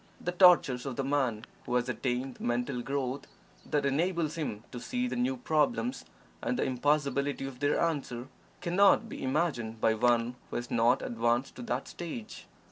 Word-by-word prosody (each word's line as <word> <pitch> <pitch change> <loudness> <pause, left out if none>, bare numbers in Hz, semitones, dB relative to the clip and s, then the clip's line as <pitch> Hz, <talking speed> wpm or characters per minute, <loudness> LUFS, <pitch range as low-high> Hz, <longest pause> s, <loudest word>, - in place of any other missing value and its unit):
The 180 - -2
tortures 175 -8 +5
of 130 - -3
the 135 - -1
man 130 -5 0 0.2
who 125 - 0
has 125 0 +2
attained 125 0 -2
the - - -10
mental 120 +1 -1
growth 135 +1 -3 0.4
that 145 -1 +1
enables 160 +2 +1
him 140 -10 -4
to 120 - -6
see 250 - -2
the - - -3
new 255 +2 0
problems 240 - 0 0.4
and 250 - -1
the - - +1
impossibility 140 +1 0
of 135 -2 -7
their 145 +1 +2
answer, 135 -7 -1 0.3
cannot 195 +5 +4
be - - -7
imagined 130 -6 -1
by 110 - +3
one 120 +1 +2
who - - -6
has 120 0 -4
not 120 +2 +3
advanced 120 +3 0
to - - -6
that 120 +2 -3
stage. 155 -11 -7
135 Hz, 175 wpm, -30 LUFS, 120-160 Hz, 0.4 s, tortures